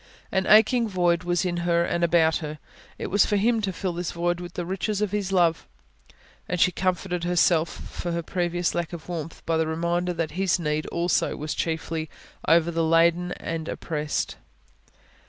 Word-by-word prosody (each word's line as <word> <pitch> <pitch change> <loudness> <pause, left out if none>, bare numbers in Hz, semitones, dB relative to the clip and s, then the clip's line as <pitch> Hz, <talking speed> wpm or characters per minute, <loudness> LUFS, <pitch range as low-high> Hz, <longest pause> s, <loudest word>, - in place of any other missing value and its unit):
An 190 0 0
aching 225 +2 +5
void 175 -3 +1
was 175 +1 +1
in 175 -1 -1
her 170 0 +2
and 170 0 -1
about 165 -1 +4
her; 155 -1 -6 0.4
it - - -5
was 205 +1 +5
for 210 - +1
Him 225 +2 +2
to 200 -2 -1
fill 185 0 -3
this 175 0 -3
void 175 0 0
with 175 0 -8
the 175 - -3
riches 195 +3 -2
of 210 -2 0
His 205 -2 -2
love. 170 -4 +2 0.8
And 180 - -1
she 180 - +5
comforted 180 -1 -1
herself 175 -2 +3
for 175 - -6
her 170 0 -2
previous 175 0 -1
lack 175 -1 -3
of 165 -2 -8
warmth, 165 -2 -6
by 165 -1 +1
the 160 0 +1
reminder 170 +2 -1
that 165 -2 -2
His 185 +2 +1
need 150 -2 -2
also 170 +1 0
was 150 +1 -3
chiefly 160 -1 -3 0.3
of 165 0 +4
the 170 - -2
heavy 165 0 0
laden 170 +2 +3
and 165 -1 -5
oppressed. 150 -2 -3
175 Hz, 190 wpm, -25 LUFS, 165-180 Hz, 0.8 s, aching